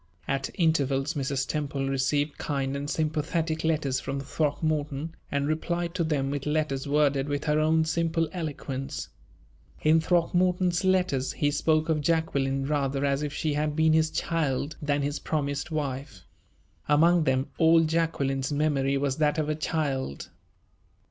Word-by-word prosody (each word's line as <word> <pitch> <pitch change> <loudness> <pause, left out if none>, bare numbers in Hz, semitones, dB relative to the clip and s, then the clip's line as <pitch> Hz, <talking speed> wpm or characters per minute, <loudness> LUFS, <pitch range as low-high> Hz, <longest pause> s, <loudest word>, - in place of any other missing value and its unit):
At 135 -1 -1
intervals 140 -5 +1
Mrs. 135 -1 -1
Temple 140 -3 -2
received 145 +2 0
kind 140 -2 -2
and 140 +1 -4
sympathetic 155 +1 -1
letters 150 -5 +1
from 140 +1 -4
Throckmorton, 150 +1 -1 0.2
and 140 0 0
replied 170 +2 -1
to 180 -2 0
them 140 -4 0
with 145 0 -3
letters 150 -3 -1
worded 145 -1 +2
with 145 0 -2
her 150 0 +2
own 160 +1 +3
simple 165 0 0
eloquence. 145 -6 -5 0.7
In 160 +1 +5
Throckmorton's 180 +1 +2
letters 180 -9 +1
he 145 -1 +1
spoke 155 +1 +1
of 160 -2 +1
Jacqueline 140 -4 0
rather 140 -1 0
as 140 0 +1
if 150 -1 -2
she 150 +1 -1
had 150 0 -1
been 160 0 +4
his 160 0 +3
child 150 -3 -1
than 145 -1 0
his 145 +1 -2
promised 145 -1 -2
wife. 135 - -4 0.6
Among 165 +3 +4
them 130 0 0
all 165 0 +6
Jacqueline's 155 -5 0
memory 140 -2 +1
was 135 -1 -1
that 150 -1 +2
of 155 -1 0
a 155 - 0
child. 145 - -2
150 Hz, 150 wpm, -27 LUFS, 140-160 Hz, 0.7 s, all